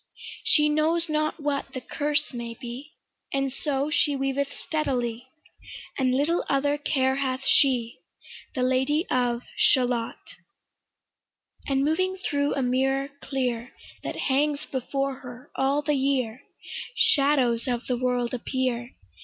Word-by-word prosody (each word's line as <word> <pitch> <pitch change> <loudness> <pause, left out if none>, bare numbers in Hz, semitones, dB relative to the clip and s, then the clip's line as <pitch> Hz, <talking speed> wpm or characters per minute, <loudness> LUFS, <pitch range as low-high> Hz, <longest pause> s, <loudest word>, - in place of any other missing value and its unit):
She 310 -10 +4
knows 315 +3 +2
not 305 +1 0
what 280 -2 -2
the - - -1
'curse' 295 +2 0
may 235 -1 -5
be, 255 +5 -8 0.4
And 275 -1 0
so 285 +1 -1
she 295 -2 +3
weaveth 270 +1 -1
steadily, 250 -6 -2 0.7
And 255 -2 +2
little 305 +6 +2
other 285 +1 +2
care 265 -3 +1
hath 265 -1 -1
she, 250 -5 +3 0.6
The 255 - +1
Lady 265 +6 +2
of 245 -1 +1
Shalott. 245 -3 +2 1.5
And 275 0 +2
moving 370 +5 +1
thro' 285 -5 0
a 275 - 0
mirror 270 +2 +1
clear 250 -3 -2 0.3
That - - -4
hangs 285 +1 +1
before 275 +1 -2
her 250 +1 -11
all 275 +2 +1
the 300 0 +1
year, 265 -3 0 0.5
Shadows 280 - +3
of 245 -1 -1
the 250 - 0
world 245 -1 0
appear. 250 -1 -2
270 Hz, 130 wpm, -26 LUFS, 250-290 Hz, 1.5 s, She